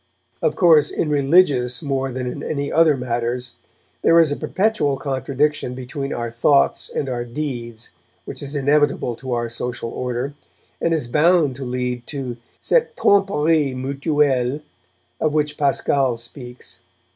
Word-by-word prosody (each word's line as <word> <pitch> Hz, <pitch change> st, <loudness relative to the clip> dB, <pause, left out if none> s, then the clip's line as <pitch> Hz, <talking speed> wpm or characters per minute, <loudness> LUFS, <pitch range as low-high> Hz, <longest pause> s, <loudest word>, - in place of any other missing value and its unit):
Of -, -, +1 dB
course, 160 Hz, -5 st, +5 dB
in 150 Hz, -, -2 dB
religious 140 Hz, -3 st, +3 dB
more 135 Hz, -2 st, -1 dB
than 125 Hz, 0 st, -4 dB
in 125 Hz, -, -5 dB
any 140 Hz, -2 st, -3 dB
other 160 Hz, -3 st, +4 dB
matters, 120 Hz, 0 st, -2 dB, 0.5 s
there 165 Hz, -, +5 dB
is 160 Hz, -3 st, +4 dB
a -, -, 0 dB
perpetual 190 Hz, -9 st, 0 dB
contradiction 135 Hz, 0 st, -1 dB
between 135 Hz, +2 st, -5 dB
our 120 Hz, -1 st, -3 dB
thoughts 135 Hz, +4 st, +2 dB
and 140 Hz, -, -3 dB
our 120 Hz, -2 st, -2 dB
deeds 120 Hz, -3 st, -5 dB, 0.3 s
which -, -, -8 dB
is 140 Hz, +1 st, -6 dB
inevitable 140 Hz, -3 st, +1 dB
to 130 Hz, 0 st, -4 dB
our 120 Hz, 0 st, -1 dB
social 120 Hz, 0 st, -5 dB
order, 125 Hz, +2 st, -3 dB, 0.5 s
and 170 Hz, -, +1 dB
is 160 Hz, -5 st, 0 dB
bound 150 Hz, +1 st, +3 dB
to 135 Hz, -, -6 dB
lead 125 Hz, -1 st, -3 dB
to 130 Hz, -4 st, -5 dB, 0.2 s
cette 485 Hz, -1 st, +1 dB
tromperie 160 Hz, -8 st, +2 dB
mutuelle 140 Hz, 0 st, 0 dB, 0.6 s
of 155 Hz, -1 st, 0 dB
which 150 Hz, -1 st, 0 dB
Pascal 140 Hz, -3 st, +1 dB
speaks. 120 Hz, +1 st, -10 dB
135 Hz, 145 wpm, -21 LUFS, 125-150 Hz, 0.6 s, course